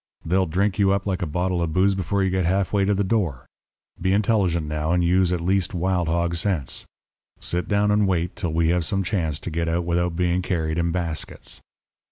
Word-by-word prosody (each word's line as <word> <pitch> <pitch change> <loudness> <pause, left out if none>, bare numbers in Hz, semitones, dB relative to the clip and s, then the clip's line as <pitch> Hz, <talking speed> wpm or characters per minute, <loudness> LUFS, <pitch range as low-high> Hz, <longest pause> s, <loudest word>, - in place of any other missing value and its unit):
They'll 95 +2 +2
drink 95 +5 0
you 100 -1 +4
up 100 0 -1
like 95 -3 -1
a 90 - -1
bottle 90 +3 -1
of 80 -2 -1
booze 95 +2 +3
before 95 +1 -1
you 95 - +1
get 95 0 +1
half 95 +2 0
way 100 -1 +3
to 105 - +2
the 100 - +1
door. 95 - -1 0.6
Be 95 +1 +2
intelligent, 95 -6 +2
now, 75 +2 -1
and 90 0 +2
use 90 +1 +3
at 90 - 0
least 95 +1 0
wild 90 -1 0
hog 85 +1 0
sense. 85 -5 -2 0.5
Sit 90 +1 -2
down 105 0 +2
and 105 -1 +3
wait 85 -2 -1
till 85 - -3
we 80 +1 +2
have 90 0 +2
some 95 +4 0
chance 85 -6 -1
to 90 - -6
get 85 +1 -1
out 85 +1 0
without 85 0 0
being 90 +1 +1
carried 80 -3 -1
in 85 0 +1
baskets.' 85 -2 -4
90 Hz, 220 wpm, -23 LUFS, 85-95 Hz, 0.6 s, you